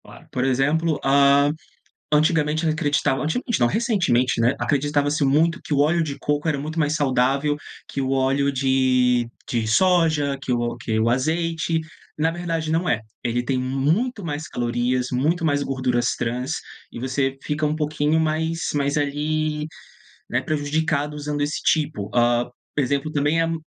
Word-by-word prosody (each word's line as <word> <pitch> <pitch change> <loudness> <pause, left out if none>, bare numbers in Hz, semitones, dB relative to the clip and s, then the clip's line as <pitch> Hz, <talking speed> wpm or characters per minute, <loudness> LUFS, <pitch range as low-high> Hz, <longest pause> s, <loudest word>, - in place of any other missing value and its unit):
Claro, - - -15
por 125 - -1
exemplo, 145 +5 +1
hã, 140 +1 +5 0.6
antigamente 155 +1 +2
acreditava 150 -3 +1
antigamente 220 +8 -1
não, - - +4
recentemente, 150 - +1
né, 120 +3 +3
acreditava-se 145 0 +1
muito 160 +5 +2
que - - -3
o 140 - +2
óleo 160 +4 +3
de 145 -3 -4
coco 145 +2 -1
era 150 -3 0
muito 155 +3 -5
mais 150 -1 +1
saudável 135 +1 +1 0.3
que - - -5
o 130 0 -1
óleo 135 +1 +2
de 130 -2 +2 0.2
de 115 -2 -1
soja, 155 0 +3
que 135 -2 -2
o 120 0 -1
que 110 -2 -2
o 115 +1 +2
azeite, 165 +5 0 0.4
na 160 +2 +2
verdade 165 -2 -3
não 165 +3 0
é, 120 -8 +1 0.2
ele 120 0 0
tem 130 +1 -1
muito 155 - 0
mais 155 -1 -4
calorias, 120 +1 -1
muito 155 +7 0
mais 145 -3 +1
gorduras 125 -3 0
trans 125 +4 -2 0.4
e - - -8
você 135 +1 -1
fica 150 +1 -2
um 150 +1 0
pouquinho 155 0 0
mais 160 +1 0 0.2
mais, 140 0 0
ali, 150 +1 -1 0.6
né, - - 0
prejudicado 150 0 -1
usando 150 0 -4
esse 145 +1 -2
tipo. 145 -10 0
Hã, 120 0 +3 0.3
por 145 - +1
exemplo 140 +3 -1
também 145 +3 +1
a - - +3
m 165 -1 -3
145 Hz, 160 wpm, -23 LUFS, 130-155 Hz, 0.6 s, hã